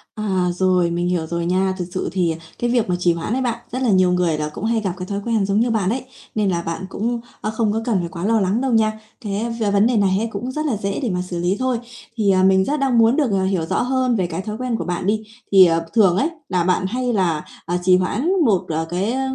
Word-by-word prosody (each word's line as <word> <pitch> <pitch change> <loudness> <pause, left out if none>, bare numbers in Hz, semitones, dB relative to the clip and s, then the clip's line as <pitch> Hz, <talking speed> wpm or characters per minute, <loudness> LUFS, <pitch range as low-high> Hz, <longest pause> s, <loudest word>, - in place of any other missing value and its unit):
À, 190 -4 0
rồi, 180 -1 +2
mình 175 +1 -1
hiểu 170 -3 0
rồi 170 0 -2
nha. 190 +2 +1
Thực 180 - -3
sự 185 - -2
thì 175 -4 0 0.2
cái 240 - 0
việc 235 -5 +1
mà 180 - +2
trì 175 -1 +3
hoãn 170 +7 -3
ấy 260 - 0
bạn, 240 -2 -1
rất 255 +2 -3
là 245 - +1
nhiều 185 -2 +4
người 175 -4 +1
là 150 0 -2
cũng 220 - -5
hay 225 -1 +1
gặp 190 -4 -2
cái 180 - -5
thói 200 0 -3
quen 225 -4 +1
giống 200 +2 +1
như 240 +1 +2
bạn 200 -4 +1
ấy, 255 +2 -2 0.3
nên 210 -2 +1
là 170 -1 0
bạn 170 +3 -4
cũng, 235 +4 -2 0.2
a, 215 - -2
không 220 -1 0
có 225 - -1
cần 190 -8 0
quá 170 +2 -6
lo 225 0 +3
lắng 200 +5 +1
đâu 265 -2 0
nha. 220 -1 +2 0.2
Thế 215 +2 -3
về 205 -2 +1
vấn 205 +3 +4
đề 245 -3 +1
này 195 -2 +2
ấy 230 - -1
cũng 240 +6 -4
rất 305 +3 -3
là 235 -8 0
dễ 200 -1 -3
để 235 - 0
mà 180 -1 -1
xử 180 -1 -5
lý 180 +3 +1
thôi. 255 -2 0 0.4
Thì, 205 -3 +3
à, 185 0 +3
mình 190 0 +4
rất 295 +1 -1
đang 265 -3 +2
muốn 230 +3 +5
được, 280 -8 +1
à, 190 -1 +1
hiểu 190 -4 0
rõ - - 0
hơn 255 -1 +1
về 185 -4 0
cái 170 +2 -4
thói 210 +2 -5
quen 250 -2 -2
của - - -4
bạn 180 +1 -3
đi. 215 +1 +1 0.3
Thì, 190 -2 +8
ờ, 165 0 +1
thường 195 -5 +4
ấy 295 +8 +2 0.2
là 180 -2 +1
bạn 185 +1 +1
hay 245 +2 -1
là, 170 -6 0 0.2
ờ, 175 +1 -1
trì 185 0 +5
hoãn 215 - -1 0.2
một, 195 -6 +3
ờ, 160 +1 -1
cái, 190 +6 -1
ơ, 265 +1 -1
200 Hz, 285 wpm, -20 LUFS, 180-230 Hz, 0.4 s, Thì